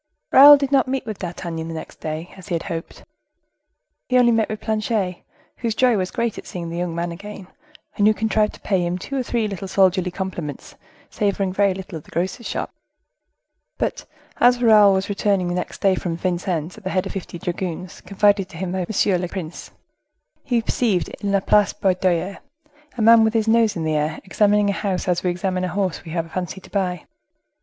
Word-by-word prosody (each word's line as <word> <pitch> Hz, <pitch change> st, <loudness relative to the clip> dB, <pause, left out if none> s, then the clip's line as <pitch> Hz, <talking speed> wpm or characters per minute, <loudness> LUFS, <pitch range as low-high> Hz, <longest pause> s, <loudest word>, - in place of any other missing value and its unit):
Raoul 290 Hz, +2 st, +10 dB
did 275 Hz, -1 st, -2 dB
not 270 Hz, -3 st, +3 dB
meet 265 Hz, 0 st, -2 dB
with 215 Hz, -3 st, -6 dB
D'Artagnan 170 Hz, -2 st, -5 dB
the 165 Hz, -, -6 dB
next 160 Hz, -, -9 dB
day, 155 Hz, +2 st, -5 dB
as 190 Hz, 0 st, -13 dB
he 175 Hz, -, -1 dB
had 165 Hz, -, -3 dB
hoped. 165 Hz, -2 st, -6 dB, 1.1 s
He 255 Hz, -, +3 dB
only 240 Hz, -1 st, +5 dB
met 225 Hz, -1 st, +1 dB
with 215 Hz, -1 st, -4 dB
Planchet, 215 Hz, -4 st, -1 dB, 0.4 s
whose 230 Hz, -2 st, -2 dB
joy 250 Hz, -1 st, +4 dB
was 185 Hz, -2 st, -1 dB
great 235 Hz, -2 st, -2 dB
at -, -, -12 dB
seeing 170 Hz, -2 st, -6 dB
the 170 Hz, -, -4 dB
young 175 Hz, -2 st, -2 dB
man 170 Hz, 0 st, -2 dB
again, 195 Hz, +2 st, -9 dB, 0.5 s
and 205 Hz, -1 st, +3 dB
who 215 Hz, -, +5 dB
contrived 215 Hz, -1 st, +1 dB
to -, -, -16 dB
pay 190 Hz, -3 st, 0 dB
him 175 Hz, +1 st, -1 dB
two 275 Hz, +9 st, -6 dB
or 265 Hz, -, +1 dB
three 235 Hz, -3 st, -1 dB
little 195 Hz, -1 st, -5 dB
soldierly 185 Hz, -1 st, +2 dB
compliments, 175 Hz, -6 st, -6 dB, 0.4 s
savoring 200 Hz, -2 st, -1 dB
very 200 Hz, -1 st, +2 dB
little 185 Hz, -3 st, -7 dB
of -, -, -18 dB
the -, -, -18 dB
grocer's 185 Hz, +7 st, -3 dB
shop. -, -, -4 dB, 1.0 s
But -, -, -2 dB, 0.3 s
as 245 Hz, 0 st, +4 dB
Raoul 210 Hz, -4 st, +7 dB
was 190 Hz, 0 st, -1 dB
returning 200 Hz, -3 st, 0 dB
the -, -, -1 dB
next 180 Hz, 0 st, -4 dB
day 195 Hz, -1 st, +4 dB
from 175 Hz, -2 st, -3 dB
Vincennes 175 Hz, 0 st, -2 dB
at -, -, -23 dB
the 185 Hz, -, -3 dB
head 190 Hz, 0 st, 0 dB
of -, -, -5 dB
fifty 185 Hz, -2 st, -6 dB
dragoons 175 Hz, -1 st, -5 dB
confided 200 Hz, -1 st, +2 dB
to -, -, -11 dB
him 180 Hz, 0 st, -3 dB
by 190 Hz, -, -2 dB
Monsieur 195 Hz, -3 st, +1 dB
le 180 Hz, -, -2 dB
Prince, 175 Hz, -2 st, -7 dB, 0.7 s
he 240 Hz, -4 st, 0 dB
perceived, 220 Hz, -6 st, 0 dB
in 200 Hz, -, -4 dB
La 200 Hz, -1 st, +2 dB
Place 205 Hz, +1 st, +3 dB
Baudoyer, 185 Hz, 0 st, 0 dB, 0.6 s
a 225 Hz, -, 0 dB
man 230 Hz, 0 st, +7 dB
with 220 Hz, +1 st, +1 dB
his 225 Hz, -1 st, +1 dB
nose 225 Hz, -1 st, +3 dB
in 165 Hz, -, -3 dB
the 155 Hz, -1 st, 0 dB
air, 155 Hz, +1 st, -1 dB
examining 205 Hz, +1 st, +2 dB
a -, -, -2 dB
house 195 Hz, -3 st, -2 dB
as 175 Hz, -1 st, +1 dB
we 180 Hz, -, 0 dB
examine 185 Hz, +1 st, -2 dB
a -, -, 0 dB
horse 185 Hz, 0 st, -2 dB
we 165 Hz, -, -10 dB
have 165 Hz, 0 st, -1 dB
a -, -, -15 dB
fancy 180 Hz, +2 st, -4 dB
to -, -, -17 dB
buy. 180 Hz, -4 st, -2 dB
190 Hz, 215 wpm, -22 LUFS, 175-215 Hz, 1.1 s, Raoul